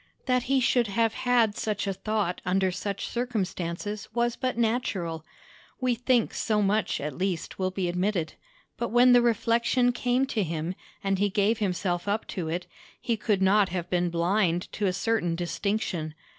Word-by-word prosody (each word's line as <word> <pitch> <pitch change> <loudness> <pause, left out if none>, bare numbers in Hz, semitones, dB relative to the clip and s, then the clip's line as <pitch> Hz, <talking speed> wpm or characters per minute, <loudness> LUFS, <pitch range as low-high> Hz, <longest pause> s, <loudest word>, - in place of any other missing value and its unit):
That 250 -1 +2
he 270 -1 +4
should 245 -2 +2
have 225 +2 +1
had 240 -4 +2
such 215 -2 -2
a 195 - -1
thought 205 -2 -2
under 190 +1 +1
such 200 +2 -4
circumstances 205 -4 -3
was 240 0 +1
but 255 -2 -2
natural; 200 -9 -1 0.6
we 255 -2 +2
think 245 -1 +1
so 215 -2 0
much, 210 +2 +1
at 145 -1 -4
least, 185 -1 -3
will 185 0 +1
be 185 -1 -2
admitted: 180 -2 -1 0.4
but 235 - -2
when 245 +2 +6
the 245 - +7
reflection 235 +2 +2
came 245 +2 +1
to 245 -5 -1
him, 165 -1 -2 0.3
and 195 -1 0
he 205 0 +2
gave 210 +3 +1
himself 180 -2 -1
up 210 +2 0
to 170 -5 -3
it, 175 +2 -2 0.3
he 235 - 0
could 210 -3 0
not 200 +1 +4
have 175 -1 -4
been 175 -1 +1
blind 175 +1 +1
to 205 - -1
a - - +2
certain 190 -3 0
distinction. 175 -2 -2
205 Hz, 170 wpm, -27 LUFS, 180-235 Hz, 0.6 s, the